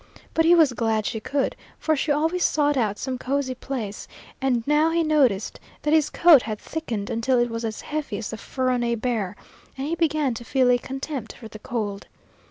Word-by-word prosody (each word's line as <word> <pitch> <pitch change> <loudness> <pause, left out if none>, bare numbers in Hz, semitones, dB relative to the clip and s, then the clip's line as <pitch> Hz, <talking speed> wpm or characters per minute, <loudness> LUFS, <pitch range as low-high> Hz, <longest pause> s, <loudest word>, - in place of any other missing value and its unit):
But 325 - +3
he 345 +1 +7
was 310 -6 +5
glad 225 -2 0
she 220 - -2
could, 275 +4 -1 0.2
for 315 - +1
she 295 +1 0
always 320 +5 +1
sought 290 -1 +2
out 215 -5 0
some 255 +1 -4
cosy 265 0 -1
place; 245 -6 -5 0.3
and 245 -4 +1
now 300 +2 +3
he 335 0 +1
noticed 270 -10 +2 0.2
that 300 - +1
his 315 -2 +4
coat 335 -7 +6
had 215 -2 -4
thickened 230 -8 -4
until 240 +3 +1
it 240 -1 +1
was 230 0 -4
as 220 -2 -4
heavy 300 -8 -4
as 215 - -5
the 220 - -5
fur 255 +3 -2
on 250 -1 0
a 235 0 +1
bear, 220 -5 -2 0.4
and 265 - -3
he 310 - -2
began 310 -5 +1
to 230 - -7
feel 255 +1 +3
a 245 - +3
contempt 270 -2 -5
for 230 - -11
the 215 - -11
cold. 205 -3 -4
255 Hz, 210 wpm, -24 LUFS, 225-300 Hz, 0.4 s, he